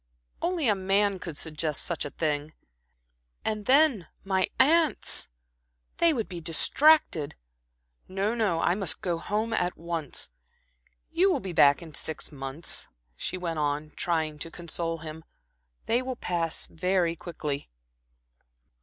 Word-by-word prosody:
"Only 340 -4 0
a 215 - +5
man 195 0 +1
could 165 -5 -6
suggest 155 -1 0
such 170 -3 -2
a - - -3
thing. 150 0 -2 0.9
And 215 -1 -2
then 265 - +4 0.2
my 190 -1 +1
aunts! 315 +3 +4 0.7
they 335 -1 +5
would 235 -8 -1
be 175 -3 -7
distracted. 165 - +4 0.7
No, 195 +4 -1
no, 210 -8 +1
I 175 - +3
must 185 -5 -1
go 175 -3 -1
home 215 +5 -1
at 180 -4 0
once. 165 - -3 0.8
You 365 +4 +4
will 310 - +1
be 190 -6 -6
back 145 +1 +5
in 160 -2 -11
six 160 +3 -2
months," 135 +3 -3 0.3
she 185 - -3
went 170 -3 -3
on, 150 +1 -1
trying 160 -3 -1
to 165 - -3
console 165 0 -3
him. 160 0 -8 0.6
"They 235 +2 +2
will 255 0 -4
pass 170 -7 -1
very 180 0 0
quickly." 150 - -5
175 Hz, 135 wpm, -28 LUFS, 160-215 Hz, 0.9 s, a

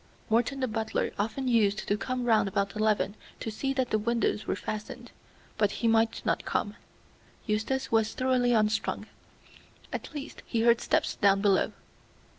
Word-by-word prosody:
Morton 245 +4 +2
the 260 - +1
butler 220 -1 -1
often 225 +6 -1
used 215 -4 +2
to 205 - +2
come 250 +4 -3
round 220 -4 +4
about 200 +1 -1
eleven 215 -1 +1 0.3
to 225 - -4
see 270 +6 -2
that 260 -2 -1
the 215 - +2
windows 230 -1 0
were - - 0
fastened, 235 +3 -6 0.5
but 210 -2 +4
he 235 - -1
might 225 0 +2
not - - +1
come. - - -2 0.7
Eustace 225 +5 -1
was 220 -1 +2
thoroughly 255 -1 +2
unstrung. 215 -2 +1 0.9
At - - -5
last 290 0 -7
he 230 - 0
heard 235 0 +4
steps - - 0
down 200 -1 +4
below. 200 -2 +3
225 Hz, 160 wpm, -29 LUFS, 210-245 Hz, 0.9 s, round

